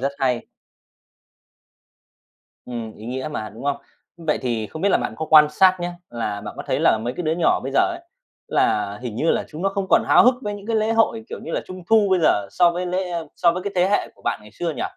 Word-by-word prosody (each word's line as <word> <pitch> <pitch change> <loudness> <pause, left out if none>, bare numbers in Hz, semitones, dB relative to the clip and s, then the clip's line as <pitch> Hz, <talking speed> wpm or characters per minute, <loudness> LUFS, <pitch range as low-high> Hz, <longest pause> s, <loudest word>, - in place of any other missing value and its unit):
rất 140 +2 -1
hay! 125 -3 0 2.2
Ừm, 115 -3 -6
ý 110 - -10
nghĩa 130 +4 -4
mà, 110 -6 -4
đúng 110 +6 -11
không? 140 0 0 0.4
Vậy 160 -3 -1
thì 115 -4 -1
không 160 - -8
biết 200 - +3
là - - +3
bạn - - -3
có 160 - -4
quan 155 -1 +8
sát 185 +4 +4
nhá, 175 0 -3 0.2
là 105 -4 -3
bạn 105 - -8
có - - -5
thấy - - 0
là 110 - +4
mấy 120 +3 -3
cái 180 - -3
đứa 155 0 0
nhỏ 175 - +3
bây 135 +1 -5
giờ - - +4
ấy, 345 -1 0 0.5
là 105 -1 +1
hình 120 -4 -5
như 160 +6 +1
là - - 0
chúng 160 +3 -8
nó 195 - +2
không 195 -1 -3
còn - - +5
háo - - +7
hức 250 0 +6
với 205 0 -3
những 205 +1 -10
cái 230 - 0
lễ 220 +1 +1
hội 225 0 +1
kiểu - - -6
như - - -7
là - - 0
Trung 185 -1 -9
thu 220 -2 +5
bây 185 - +4
giờ 100 -8 +3
so 175 - +4
với 180 +1 -3
lễ 180 0 -2 0.3
so 170 - +4
với 180 +1 -4
cái 200 0 -4
thế 180 +1 +3
hệ 205 - +1
của - - -24
bạn - - -1
ngày 105 - -15
xưa 170 -1 -3
nhỉ? - - -5
160 Hz, 260 wpm, -22 LUFS, 120-190 Hz, 2.2 s, quan